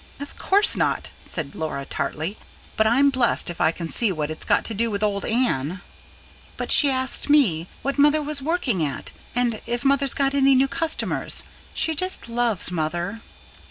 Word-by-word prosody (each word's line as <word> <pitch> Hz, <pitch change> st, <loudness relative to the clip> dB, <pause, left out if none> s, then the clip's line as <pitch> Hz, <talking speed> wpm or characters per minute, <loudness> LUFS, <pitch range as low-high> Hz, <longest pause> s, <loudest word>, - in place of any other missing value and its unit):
"Of 285 Hz, 0 st, -8 dB
course 405 Hz, +2 st, +3 dB
not," -, -, -1 dB
said 150 Hz, -5 st, -5 dB
Laura 155 Hz, -3 st, -4 dB
tartly. 155 Hz, +7 st, -3 dB, 0.4 s
"But 220 Hz, -, +3 dB
I'm 275 Hz, +5 st, +4 dB
blessed 245 Hz, -8 st, +1 dB
if 170 Hz, -, -7 dB
I 160 Hz, -, +4 dB
can 165 Hz, 0 st, -6 dB
see 215 Hz, +5 st, +1 dB
what 155 Hz, -3 st, -3 dB
it's 155 Hz, -, -6 dB
got -, -, +2 dB
to 225 Hz, -, -2 dB
do 230 Hz, +2 st, 0 dB
with 205 Hz, -1 st, -3 dB
old 200 Hz, -1 st, -1 dB
Anne." 185 Hz, -, -1 dB, 0.8 s
"But -, -, -3 dB
she 290 Hz, -, +7 dB
asked 260 Hz, +2 st, -1 dB
me... 195 Hz, -, +3 dB, 0.2 s
what 275 Hz, +1 st, -2 dB
mother 295 Hz, +2 st, +5 dB
was 290 Hz, -1 st, -3 dB
working 265 Hz, -, 0 dB
at 140 Hz, -3 st, -4 dB, 0.2 s
and 240 Hz, -3 st, 0 dB
if 240 Hz, +2 st, -2 dB
she'd 275 Hz, 0 st, +2 dB
got 275 Hz, -1 st, +1 dB
any 275 Hz, -1 st, +4 dB
new 265 Hz, +1 st, +4 dB
customers. 325 Hz, +3 st, -1 dB, 0.3 s
She 320 Hz, -, +2 dB
just 370 Hz, -1 st, -1 dB
loves 230 Hz, -6 st, 0 dB
mother." 175 Hz, +6 st, -3 dB
235 Hz, 180 wpm, -23 LUFS, 175-275 Hz, 0.8 s, she